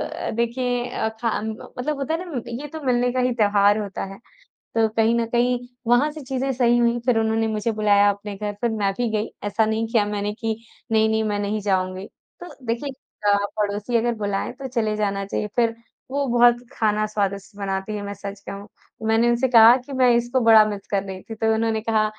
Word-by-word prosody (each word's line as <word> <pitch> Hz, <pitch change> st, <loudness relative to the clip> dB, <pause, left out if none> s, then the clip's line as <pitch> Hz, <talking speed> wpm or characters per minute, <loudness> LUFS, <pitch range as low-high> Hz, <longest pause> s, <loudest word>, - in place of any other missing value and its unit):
अ, -, -, -4 dB
देखिए 245 Hz, +1 st, -1 dB
अ, 220 Hz, -2 st, -1 dB
खाम 220 Hz, -2 st, -1 dB, 0.3 s
मतलब 295 Hz, +4 st, -1 dB
होता 280 Hz, +3 st, -1 dB
है 350 Hz, +3 st, -3 dB
ना 245 Hz, -, -2 dB, 0.2 s
ये -, -, -5 dB
तो 315 Hz, +2 st, -7 dB
मिलने 245 Hz, -1 st, +2 dB
का 255 Hz, -, 0 dB
ही 250 Hz, 0 st, +2 dB
त्योहार 205 Hz, -1 st, +3 dB
होता 205 Hz, -2 st, -4 dB
है। 195 Hz, -, -11 dB, 0.6 s
तो 225 Hz, -1 st, +4 dB
कहीं 225 Hz, +1 st, +4 dB
न 235 Hz, 0 st, +1 dB
कहीं 245 Hz, +1 st, +2 dB, 0.3 s
वहाँ 245 Hz, +5 st, +4 dB
से 305 Hz, 0 st, -9 dB
चीज़ें 265 Hz, +1 st, -2 dB
सही 240 Hz, -1 st, +3 dB
हुईं 240 Hz, 0 st, +2 dB
फिर 250 Hz, -3 st, +3 dB
उन्होंने 225 Hz, 0 st, +1 dB
मुझे 220 Hz, +1 st, -1 dB
बुलाया 205 Hz, -1 st, +4 dB
अपने 205 Hz, 0 st, -4 dB
घर 210 Hz, 0 st, -3 dB
फिर 235 Hz, -, +2 dB
मैं 205 Hz, -3 st, 0 dB
भी 240 Hz, -2 st, 0 dB
गई 215 Hz, 0 st, -1 dB
ऐसा 205 Hz, +2 st, +1 dB
नहीं 220 Hz, +1 st, -1 dB
किया 225 Hz, -2 st, +2 dB
मैंने 205 Hz, 0 st, -2 dB
कि 225 Hz, 0 st, -2 dB, 0.4 s
नहीं-नहीं 220 Hz, 0 st, +3 dB
मैं 205 Hz, -1 st, -1 dB
नहीं 205 Hz, +1 st, -1 dB
जाऊँगी। 185 Hz, -1 st, -1 dB, 0.3 s
तो 355 Hz, -, -8 dB, 0.2 s
देखिए 235 Hz, +5 st, -2 dB, 0.4 s
अ, -, -, +4 dB, 0.2 s
पड़ोसी 210 Hz, +3 st, -1 dB
अगर 235 Hz, +1 st, +1 dB
बुलाएँ 205 Hz, -2 st, -2 dB
तो 265 Hz, +1 st, -7 dB
चले 225 Hz, -4 st, -1 dB
जाना 200 Hz, -1 st, -1 dB
चाहिए 210 Hz, +1 st, -3 dB
फिर 230 Hz, -2 st, +2 dB, 0.4 s
वो 280 Hz, 0 st, 0 dB
बहुत 240 Hz, 0 st, +5 dB
खाना 215 Hz, -3 st, +1 dB
स्वादिष्ट 200 Hz, -1 st, -3 dB
बनाती 195 Hz, +1 st, -3 dB
हैं, 205 Hz, -, -4 dB
मैं 200 Hz, 0 st, -5 dB
सच 200 Hz, 0 st, -8 dB
कहूँ। 200 Hz, +1 st, -7 dB, 0.4 s
मैंने 225 Hz, +2 st, +3 dB
उनसे 240 Hz, +2 st, +2 dB
कहा 230 Hz, 0 st, +8 dB
कि 280 Hz, -, -8 dB
मैं 255 Hz, -1 st, +4 dB
इसको 240 Hz, +2 st, +1 dB
बड़ा 220 Hz, -1 st, +8 dB
मिस 205 Hz, -2 st, -5 dB
कर 200 Hz, -1 st, +1 dB
रही 190 Hz, -1 st, -7 dB
थी 225 Hz, -, -5 dB
तो 220 Hz, 0 st, +1 dB
उन्होंने 220 Hz, 0 st, 0 dB
कहा 220 Hz, -1 st, +1 dB
220 Hz, 210 wpm, -23 LUFS, 205-240 Hz, 0.6 s, कहा